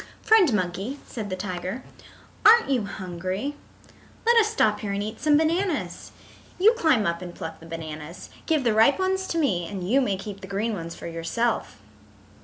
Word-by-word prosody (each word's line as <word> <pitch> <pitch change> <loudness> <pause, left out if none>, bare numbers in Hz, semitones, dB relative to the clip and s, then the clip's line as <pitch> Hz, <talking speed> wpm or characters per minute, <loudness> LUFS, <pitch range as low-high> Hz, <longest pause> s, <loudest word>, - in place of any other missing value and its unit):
"Friend 425 - +5
Monkey," 200 +6 -2
said 215 -4 -6
the 185 - -2
tiger, 185 +4 -4 0.6
"aren't 455 -8 +7
you 245 -6 +1
hungry? 190 +7 -4 0.7
Let 470 +1 +5
us 440 -2 +5
stop 215 - +2
here 200 -2 -3
and 200 +1 -1
eat 215 +1 -6
some 295 0 +4
bananas. 335 +2 -1 0.5
You 425 +5 +6
climb 315 - +2
up 170 +1 -1
and 175 -1 -8
pluck 160 0 -7
the 165 - -13
bananas. 160 0 -8 0.2
Give 310 -4 +2
the 235 -3 +2
ripe 225 +6 +5
ones 380 0 0
to 335 - -2
me 190 - +1
and 185 -1 -5
you 265 +7 +4
may 200 -7 0
keep 200 0 -8
the 190 - -8
green 205 +4 -1
ones 170 -4 -6
for - - -10
yourself." 170 +8 -2
210 Hz, 185 wpm, -25 LUFS, 180-295 Hz, 0.7 s, aren't